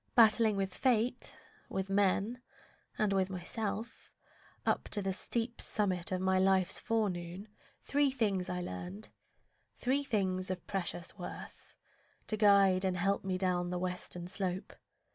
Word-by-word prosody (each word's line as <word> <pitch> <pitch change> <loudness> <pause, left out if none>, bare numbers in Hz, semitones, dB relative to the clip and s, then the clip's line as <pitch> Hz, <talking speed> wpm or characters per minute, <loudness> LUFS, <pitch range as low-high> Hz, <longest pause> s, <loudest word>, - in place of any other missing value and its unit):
Battling 220 -2 +6
with 195 -1 -1
fate, 245 0 +1 0.3
with 190 0 -2
men, 200 +5 +2 0.6
and 210 -3 +2
with 190 -1 +2
myself, 210 +5 -4 0.6
Up - - 0
the 195 -2 0
steep 235 +5 -2
summit 185 -5 0
of 185 - 0
my 190 0 +3
life's 190 -1 +3
forenoon, 195 -4 -2 0.4
Three 285 0 +2
things 205 -8 0
I 180 0 -2
learned, 95 - -6 0.7
three 270 +3 +1
things 190 -7 0
of 185 -2 -4
precious 185 0 -4
worth, 175 - -8 0.5
To 215 - 0
guide 200 -3 +5
and 185 -1 0
help 195 +3 +1
me 190 -1 -1
down 180 -1 +1
the 180 - -2
western 180 -1 -3
slope. 185 0 -3
195 Hz, 135 wpm, -33 LUFS, 185-215 Hz, 0.7 s, Battling